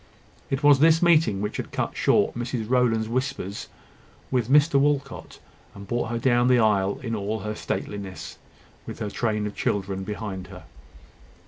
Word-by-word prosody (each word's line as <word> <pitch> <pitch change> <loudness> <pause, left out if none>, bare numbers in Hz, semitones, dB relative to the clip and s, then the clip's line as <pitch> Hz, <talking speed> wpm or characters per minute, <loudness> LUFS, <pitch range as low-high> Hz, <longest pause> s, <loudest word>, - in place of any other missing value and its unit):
It 135 +2 -2
was 145 -2 +6
this 165 +2 +5
meeting 160 - +3
which 105 - -3
had - - -5
cut - - -3
short - - +2
Mrs 120 -2 -4
Rowland's 120 -3 +2
whispers 125 -5 -3 0.6
with 125 -3 0
Mr 145 0 +5
Walcot, 140 -3 -1 0.4
and 100 0 -10
brought 120 -1 -2
her 115 - -2
down 120 0 +2
the 125 -1 +5
aisle 105 0 +2
in 115 -2 -3
all 105 +1 -3
her 105 0 -4
stateliness, 100 -5 -6 0.5
with - - -7
her 105 - -4
train 110 -2 -1
of 105 - -5
children 95 -1 -2
behind 100 -3 -5
her. - - -11
115 Hz, 160 wpm, -25 LUFS, 105-130 Hz, 0.6 s, was